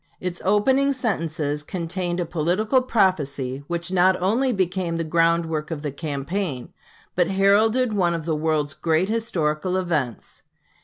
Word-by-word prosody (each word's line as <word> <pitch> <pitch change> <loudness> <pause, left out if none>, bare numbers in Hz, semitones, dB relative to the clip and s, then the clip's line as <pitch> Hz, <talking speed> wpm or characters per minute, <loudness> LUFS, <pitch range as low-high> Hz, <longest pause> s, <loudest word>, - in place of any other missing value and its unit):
Its 180 -1 -5
opening 260 +8 +3
sentences 165 - -2
contained 175 +2 -3
a 175 - 0
political 180 - +1
prophecy 145 - 0
which 170 +1 -3
not 185 0 +3
only 230 +8 +1
became 185 -4 -1
the 165 - -1
ground 165 +1 +2
work 155 -2 -3
of 160 -3 -5
the 145 - -2
campaign, 145 0 -4 0.4
but 175 -1 +3
heralded 215 +5 +3
one 175 -4 +1
of 165 -2 -5
the 160 -2 0
world's 155 -2 0
great 165 +5 0
historical 185 -6 -1
events. 155 -10 -3
175 Hz, 145 wpm, -23 LUFS, 155-195 Hz, 0.4 s, opening